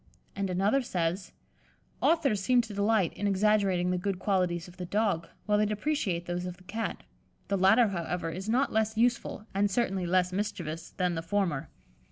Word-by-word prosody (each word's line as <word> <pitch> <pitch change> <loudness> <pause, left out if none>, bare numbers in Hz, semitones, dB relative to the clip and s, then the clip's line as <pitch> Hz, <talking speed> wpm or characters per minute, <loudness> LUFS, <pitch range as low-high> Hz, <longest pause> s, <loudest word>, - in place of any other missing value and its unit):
And 200 -1 -2
another 200 +9 +2
says: 180 -4 -2 0.7
"Authors 275 - +2
seem 245 +4 +4
to 225 -3 -8
delight 200 -3 +2
in 205 - -2
exaggerating 195 -3 +2
the 180 - 0
good 195 0 -2
qualities 180 -3 0
of 180 - -15
the 180 - -5
Dog, 195 -5 0 0.2
while 210 0 +2
they 210 - +3
depreciate 210 - -1
those 175 +1 -3
of 180 0 -7
the 185 - -18
Cat; 220 +5 -4 0.5
the 200 - +2
latter, 205 +5 +5
however, 170 -2 -3
is 190 +5 -5
not 255 +5 +2
less 220 0 +1
useful, 235 -2 0
and 200 +1 +2
certainly 190 -4 0
less 180 0 +2
mischievous, 170 -5 -3
than 180 -2 -1
the 165 - -2
former." 170 -5 -1
195 Hz, 180 wpm, -29 LUFS, 180-215 Hz, 0.7 s, latter